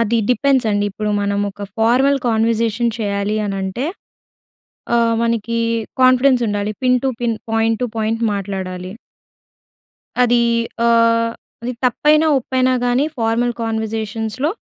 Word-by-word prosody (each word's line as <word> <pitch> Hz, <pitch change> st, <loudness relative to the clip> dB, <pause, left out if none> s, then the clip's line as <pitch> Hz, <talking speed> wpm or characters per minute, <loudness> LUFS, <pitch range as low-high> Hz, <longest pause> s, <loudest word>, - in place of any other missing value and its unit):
అది 230 Hz, +1 st, +1 dB
డిపెండ్స్ 265 Hz, -2 st, +2 dB
అండి. 205 Hz, 0 st, +1 dB
ఇప్పుడు 210 Hz, +1 st, -3 dB
మనం 200 Hz, 0 st, 0 dB
ఒక 205 Hz, +1 st, -11 dB, 0.2 s
ఫార్వల్ 260 Hz, +5 st, +3 dB
కన్వర్జేషన్ 230 Hz, +1 st, +1 dB
చేయాలి 205 Hz, 0 st, -1 dB
అని 195 Hz, -1 st, -3 dB
అంటే, 190 Hz, +9 st, -3 dB, 1.1 s
ఆహ్, 230 Hz, -1 st, +2 dB
మనకి 230 Hz, 0 st, -1 dB, 0.4 s
కాన్‌ఫిడెన్స్ 255 Hz, 0 st, +4 dB
ఉండాలి. 205 Hz, +1 st, -2 dB
Pin 250 Hz, 0 st, +4 dB
to 270 Hz, -, +2 dB
pin, 230 Hz, -2 st, 0 dB, 0.2 s
point 225 Hz, 0 st, +1 dB
to 250 Hz, -, +1 dB
point 225 Hz, +1 st, -1 dB
మాట్లాడాలి. 190 Hz, -2 st, -5 dB, 1.3 s
అది 240 Hz, -1 st, +3 dB, 0.4 s
ఆహ్, 230 Hz, 0 st, +3 dB, 0.3 s
అది 245 Hz, +1 st, -3 dB
తప్పైనా 300 Hz, +5 st, +3 dB
ఒప్పైనా 255 Hz, 0 st, +1 dB
గాని 245 Hz, +3 st, +2 dB
ఫార్మల్ 230 Hz, +1 st, 0 dB
కన్వర్జేషన్స్‌లో 220 Hz, +4 st, -2 dB
230 Hz, 125 wpm, -18 LUFS, 210-245 Hz, 1.3 s, కాన్‌ఫిడెన్స్